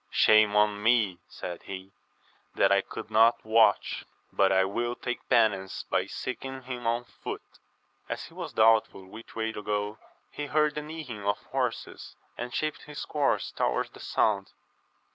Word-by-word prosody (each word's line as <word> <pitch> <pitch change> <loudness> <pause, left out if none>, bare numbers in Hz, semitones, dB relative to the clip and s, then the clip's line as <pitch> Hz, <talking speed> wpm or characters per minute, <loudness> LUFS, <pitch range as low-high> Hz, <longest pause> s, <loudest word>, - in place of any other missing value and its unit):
Shame 110 -1 +5
on 105 -1 +3
me, 110 -5 +3
said 85 -1 -7
he, 95 0 -8 0.6
that - - +4
I 100 0 +5
could 110 +3 -8
not 115 +2 +4
watch! 110 -2 +3 0.3
but 95 -1 +4
I 95 0 +4
will 120 +5 -2
take 125 -1 -5
penance 95 -4 +2
by - - +1
seeking 130 +1 -5
him 125 -2 -5
on 120 +1 +1
foot. - - -7 0.7
As - - -3
he - - -15
was - - -6
doubtful 110 -3 +3
which 110 +5 -12
way 110 0 -1
to 105 - -6
go, 105 0 -2 0.3
he 145 - -5
heard 150 +1 +2
the 150 - -3
neighing 150 -9 -7
of 100 +1 +1
horses, 130 -3 -3 0.2
and 120 0 -5
shaped 155 +4 -2
his 150 0 -7
course 145 -2 0
towards - - 0
the - - -14
soimd. 100 -3 +1
110 Hz, 160 wpm, -28 LUFS, 105-125 Hz, 0.7 s, Shame